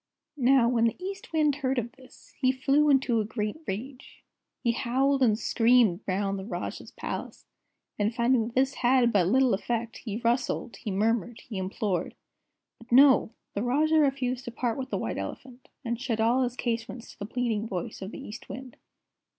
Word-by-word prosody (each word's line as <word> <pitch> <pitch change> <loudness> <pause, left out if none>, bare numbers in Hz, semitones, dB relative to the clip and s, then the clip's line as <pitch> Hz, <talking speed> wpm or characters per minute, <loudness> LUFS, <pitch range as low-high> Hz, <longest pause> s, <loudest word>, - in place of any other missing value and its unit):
"Now, 260 -2 +4
when 235 -1 +2
the 230 - +1
East 390 +2 -7
Wind 300 -3 +2
heard 270 -2 -1
of 240 0 -2
this, 260 -1 -19
he 255 -1 +4
flew 275 +3 +2
into 260 -5 +3
a - - -1
great 210 +2 -3
rage. 250 +7 -7 0.4
He 235 - +3
howled 265 +4 +1
and 220 -4 +4
screamed 230 -6 +3
round 195 +1 -1
the - - -6
Rajah's 210 - -5
Palace, - - -6 0.5
and 210 +1 +2
finding 235 -1 +2
that 235 - -10
this 270 +1 +2
had 245 -2 +3
but 185 -4 +3
little 260 +4 +4
effect, 230 +3 -2
he 215 -3 -5
rustled, 240 0 -1
he - - -6
murmured, 225 +4 0
he 210 -5 -6
implored. 190 -1 -2 0.6
But 230 +1 -17
no! 260 -2 +6 0.2
The 200 - -2
Rajah 305 +6 +3
refused 265 -3 0
to 240 - -5
part 235 -1 -1
with 260 0 -4
the - - -1
White - - -3
Elephant, 255 -1 -8 0.2
and 235 0 -2
shut 240 -4 -2
all 235 +4 +3
his 245 -1 -1
casements 235 -1 -4
to - - -19
the 205 - -5
pleading 225 -2 -1
voice 185 -2 -5
of 190 - -5
the - - -9
East 210 +3 -10
Wind." 255 -1 -8
240 Hz, 185 wpm, -28 LUFS, 220-260 Hz, 0.6 s, no